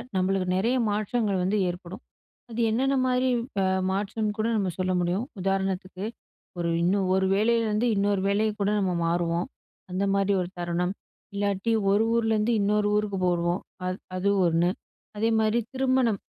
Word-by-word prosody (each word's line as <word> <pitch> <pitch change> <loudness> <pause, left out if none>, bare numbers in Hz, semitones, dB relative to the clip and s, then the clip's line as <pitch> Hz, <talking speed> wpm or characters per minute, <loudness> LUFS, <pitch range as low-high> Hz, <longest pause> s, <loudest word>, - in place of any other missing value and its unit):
நம்மளுக்கு 185 0 +1
நெறைய 230 +7 +1
மாற்றங்கள் 205 -2 0
வந்து 195 +3 +1
ஏற்படும். 180 +4 -7 0.5
அது 235 +1 -3
என்னென்ன 265 +5 +1
மாரி 255 0 +2 0.3
அ 190 - +2 0.3
மாற்றம்னு 210 +2 -1
கூட 220 - +1
நம்ம 195 -3 0
சொல்ல 185 0 0
முடியும். 180 +6 0 0.2
உதாரணத்துக்கு 190 0 -2 0.5
ஒரு 170 -1 0
இன்னும், 190 +2 +2
ஒரு 190 0 +2
வேளையிலருந்து 225 +1 +2
இன்னொரு 200 -1 +1
வேலையை 215 +2 +2
கூட 200 - +2
நம்ம 185 -3 0
மாறுவோம் 170 0 0 0.4
அந்த 185 +2 -1
மாரி 200 0 +2
ஒரு 175 - -4
தருணம். 175 +2 -1 0.4
இல்லாட்டி 200 +2 0 0.2
ஒரு 205 +2 +4
ஊருலருந்து 225 0 +2
இன்னொரு 210 +1 +2
ஊருக்கு 210 -2 0
போவோம் 175 0 0 0.3
அது 185 0 -2 0.2
அது 195 +2 +1 0.2
1 170 +1 +2 0.5
அதே 225 +2 +1
மாரி 220 +1 +2
திருமணம் 260 -5 +2
200 Hz, 145 wpm, -26 LUFS, 185-220 Hz, 0.5 s, ஒரு